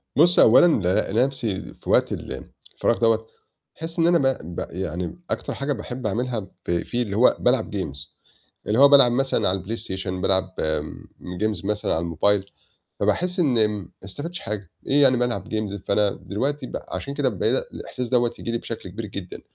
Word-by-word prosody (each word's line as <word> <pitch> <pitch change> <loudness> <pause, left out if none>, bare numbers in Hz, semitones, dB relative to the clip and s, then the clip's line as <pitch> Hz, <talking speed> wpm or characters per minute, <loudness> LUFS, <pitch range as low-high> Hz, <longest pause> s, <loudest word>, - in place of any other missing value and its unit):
بُص 175 +5 +5
أولًا 120 +9 +8 0.4
ألاقي - - -4
نَفْسي 115 -8 -3 0.2
في - - -9
وقت - - +4
الفراغ 115 - -3
دوّه 115 -1 +3 0.5
باحس 165 +2 -6
إن 165 - +4
أنا 175 0 +5
ب 130 - -1
ب - - -3
يعني 90 - -4
أكتر - - -2
حاجة 140 +1 -1
باحب 125 +1 -5
أعملها 115 -1 -2 0.2
ف - - -2
فيه 105 +8 -1
اللي 100 -3 -4
هو 125 - +5
بالعب 125 +1 +2
games، 70 -8 -3 0.7
اللي 110 +3 +1
هو 140 - +9
بالعب 135 -4 +7
مثلًا 135 -4 +1
على 95 0 -1
الPlayStation، 95 -2 -5
بالعب 95 +1 +1
آمم 80 +3 -4
games 105 0 -1
مثلًا 105 +1 -1
على 80 - 0
الموبايل، 95 +4 +1 0.5
فباحس 180 +1 0
إن 125 -10 +3
ما 105 -3 -5
استفدتش 145 - -6
حاجة، 100 -4 -5 0.2
إيه 145 +1 +4
يعني 130 -2 +5
بالعب 120 -6 -1
games! 110 -2 -2
فأنا 100 0 +3
دلوقتي 140 +12 -3
ب - - -4
عشان 140 - -4
كده 140 -2 +1
بعيد 100 - 0
الإحساس 125 -1 -5
دوّة 120 -1 +2
ييجي 115 - -3
لي 115 - 0
بشكل 115 -5 -7
كبير 110 +5 -6
جدًا، 95 -3 -7
110 Hz, 180 wpm, -24 LUFS, 95-130 Hz, 0.7 s, هو